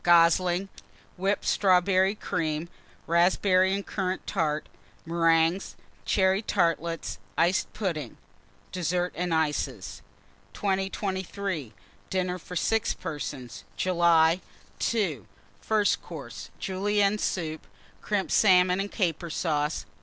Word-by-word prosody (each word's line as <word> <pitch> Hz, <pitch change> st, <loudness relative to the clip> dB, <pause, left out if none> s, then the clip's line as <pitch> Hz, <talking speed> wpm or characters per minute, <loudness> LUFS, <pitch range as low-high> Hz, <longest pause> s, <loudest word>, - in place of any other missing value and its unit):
Goslings. 175 Hz, +2 st, +4 dB, 0.5 s
Whipped 195 Hz, +2 st, -1 dB
Strawberry 190 Hz, +1 st, +3 dB
Cream. 160 Hz, -4 st, -2 dB, 0.4 s
Raspberry 185 Hz, +2 st, +3 dB
and 200 Hz, -, -4 dB
Currant 190 Hz, -2 st, -3 dB
Tart. 155 Hz, -1 st, -1 dB, 0.4 s
Meringues. 165 Hz, +2 st, +2 dB, 0.3 s
Cherry 190 Hz, 0 st, +3 dB
Tartlets. 170 Hz, -, -1 dB, 0.2 s
Iced 175 Hz, +3 st, +2 dB
Pudding. 155 Hz, -, -3 dB, 0.5 s
DESSERT 180 Hz, 0 st, -1 dB
AND 175 Hz, 0 st, -2 dB
ICES. 145 Hz, -, -1 dB, 0.5 s
2023. 190 Hz, -, -2 dB, 0.4 s
DINNER 185 Hz, -1 st, -1 dB
FOR 180 Hz, -, -9 dB
6 225 Hz, +5 st, +1 dB
PERSONS 130 Hz, -8 st, -6 dB
(July). 170 Hz, -1 st, +4 dB, 0.5 s
II. 175 Hz, -, -1 dB, 0.3 s
FIRST 210 Hz, -, +1 dB
COURSE. 120 Hz, -, -9 dB
Julienne 200 Hz, +2 st, +1 dB
Soup. 160 Hz, -6 st, -3 dB, 0.3 s
Crimped 205 Hz, -2 st, -1 dB
Salmon 185 Hz, -2 st, +5 dB
and 200 Hz, +1 st, -3 dB
Caper 170 Hz, -4 st, -1 dB
Sauce. 155 Hz, -2 st, -1 dB
180 Hz, 95 wpm, -27 LUFS, 160-190 Hz, 0.5 s, Salmon